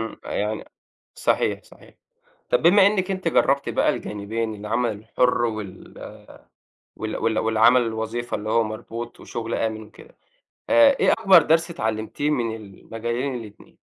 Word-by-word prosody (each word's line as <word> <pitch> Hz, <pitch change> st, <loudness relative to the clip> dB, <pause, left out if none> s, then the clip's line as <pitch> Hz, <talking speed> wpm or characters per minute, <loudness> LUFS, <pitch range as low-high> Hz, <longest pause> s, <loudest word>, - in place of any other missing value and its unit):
إمم 110 Hz, 0 st, -5 dB
فيعني 105 Hz, +1 st, -4 dB, 0.5 s
صحيح، -, -, 0 dB
صحيح، -, -, -19 dB, 0.6 s
طَب -, -, +2 dB
بما 190 Hz, +4 st, +6 dB
إنَِك 195 Hz, -2 st, +1 dB
أنتِ 185 Hz, -3 st, -1 dB
جربتِ 140 Hz, -3 st, +2 dB
بقى -, -, +1 dB
الجانبين، 110 Hz, +2 st, -4 dB
العمل 110 Hz, +4 st, -1 dB
الحُر، 115 Hz, +4 st, 0 dB
وال 110 Hz, -5 st, -7 dB, 0.8 s
وال 110 Hz, 0 st, -4 dB
وال 110 Hz, -1 st, 0 dB
والعمل 115 Hz, +3 st, +4 dB
الوظيفة 115 Hz, +1 st, -3 dB
اللي 105 Hz, +1 st, -6 dB
هو 115 Hz, +1 st, +3 dB
مربوط 115 Hz, +2 st, -7 dB
وشُغل 115 Hz, -1 st, -5 dB
آمن 110 Hz, -1 st, -2 dB
وكده، 455 Hz, -, -16 dB, 0.5 s
آآ 285 Hz, -1 st, +6 dB
إيه -, -, +4 dB
أكبر 195 Hz, -6 st, +6 dB
درْس 165 Hz, +2 st, +2 dB
اتعلمتيه 110 Hz, +2 st, -2 dB
من 120 Hz, -6 st, -1 dB
المجالين 115 Hz, +5 st, -5 dB
الاتنين؟ 110 Hz, -4 st, -11 dB
115 Hz, 140 wpm, -23 LUFS, 110-140 Hz, 0.8 s, بما